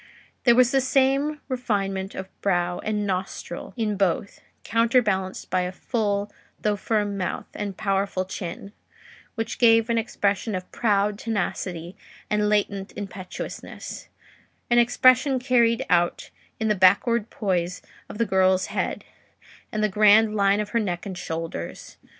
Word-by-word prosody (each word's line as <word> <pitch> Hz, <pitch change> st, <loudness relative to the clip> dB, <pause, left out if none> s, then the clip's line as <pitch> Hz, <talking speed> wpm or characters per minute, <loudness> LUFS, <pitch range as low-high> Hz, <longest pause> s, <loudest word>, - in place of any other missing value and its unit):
There 240 Hz, -2 st, +6 dB
was 250 Hz, 0 st, +5 dB
the 270 Hz, -1 st, +3 dB
same 275 Hz, +3 st, +1 dB
refinement 200 Hz, -7 st, -2 dB
of 190 Hz, -, -5 dB
brow 175 Hz, -2 st, 0 dB
and 210 Hz, -1 st, -2 dB
nostril 185 Hz, -2 st, -4 dB
in 215 Hz, -3 st, -1 dB
both, 195 Hz, +1 st, -1 dB, 0.2 s
counterbalanced 225 Hz, -5 st, +1 dB
by 185 Hz, -, +2 dB
a 180 Hz, 0 st, -2 dB
full 205 Hz, 0 st, -2 dB, 0.3 s
though 210 Hz, -1 st, +1 dB
firm 205 Hz, -1 st, -1 dB
mouth 185 Hz, -, -3 dB
and 200 Hz, -2 st, -5 dB
powerful 195 Hz, -2 st, 0 dB
chin, 190 Hz, +2 st, -7 dB, 0.6 s
which 225 Hz, -1 st, -4 dB
gave 230 Hz, -1 st, +5 dB
an 230 Hz, -, +2 dB
expression 205 Hz, -1 st, -1 dB
of 185 Hz, 0 st, -6 dB
proud 205 Hz, -2 st, +1 dB
tenacity 180 Hz, -5 st, -3 dB, 0.4 s
and 210 Hz, 0 st, +2 dB
latent 200 Hz, -2 st, 0 dB
impetuousness: 190 Hz, -2 st, -7 dB, 0.6 s
an 240 Hz, -, +6 dB
expression 255 Hz, +3 st, +4 dB
carried 240 Hz, -3 st, +2 dB
out 175 Hz, -1 st, +1 dB, 0.3 s
in 220 Hz, -, 0 dB
the 210 Hz, -, +3 dB
backward 205 Hz, +4 st, +3 dB
poise 180 Hz, -3 st, -2 dB, 0.3 s
of -, -, -8 dB
the 230 Hz, -, +1 dB
girl's 190 Hz, -1 st, +3 dB
head, -, -, -2 dB, 0.7 s
and 215 Hz, 0 st, -1 dB
the -, -, +4 dB
grand 210 Hz, +2 st, +5 dB
line 200 Hz, 0 st, +3 dB
of 210 Hz, -1 st, -2 dB
her 230 Hz, -, +1 dB
neck 180 Hz, -5 st, -3 dB
and 195 Hz, -2 st, -5 dB
shoulders. 165 Hz, -, -6 dB
205 Hz, 140 wpm, -24 LUFS, 190-230 Hz, 0.7 s, There